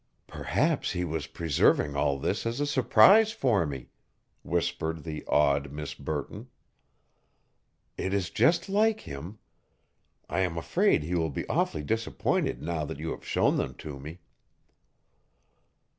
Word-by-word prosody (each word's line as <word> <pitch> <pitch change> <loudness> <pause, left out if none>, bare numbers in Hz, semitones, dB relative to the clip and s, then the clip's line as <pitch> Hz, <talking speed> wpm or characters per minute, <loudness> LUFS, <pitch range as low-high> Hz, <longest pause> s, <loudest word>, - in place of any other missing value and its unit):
"Perhaps - - -1
he 90 0 -1
was 80 -3 -3
preserving 75 -1 +1
all 70 -1 +1
this 70 - -2
as 115 +3 -3
a 145 - +1
surprise 150 - +5
for 115 - +1
me," 70 -3 -7 0.5
whispered 80 -1 -2
the 80 -2 -6
awed 70 -1 +2
Miss 75 0 -5
Burton. 70 0 -5 1.5
"It 95 - -2
is 95 -3 -1
just 170 +3 +3
like 215 +2 +2
him. 80 +9 -8 0.9
I 85 - -2
am 90 -3 0
afraid 75 -2 +2
he 85 +4 -4
will 80 -2 +1
be 70 - -5
awfully 75 - 0
disappointed 110 - -1
now 80 -1 -2
that 70 - -6
you 80 +2 -4
have - - -7
shown - - +1
them - - -2
to 70 -3 -8
me." 80 +6 -9
80 Hz, 140 wpm, -28 LUFS, 75-110 Hz, 1.5 s, surprise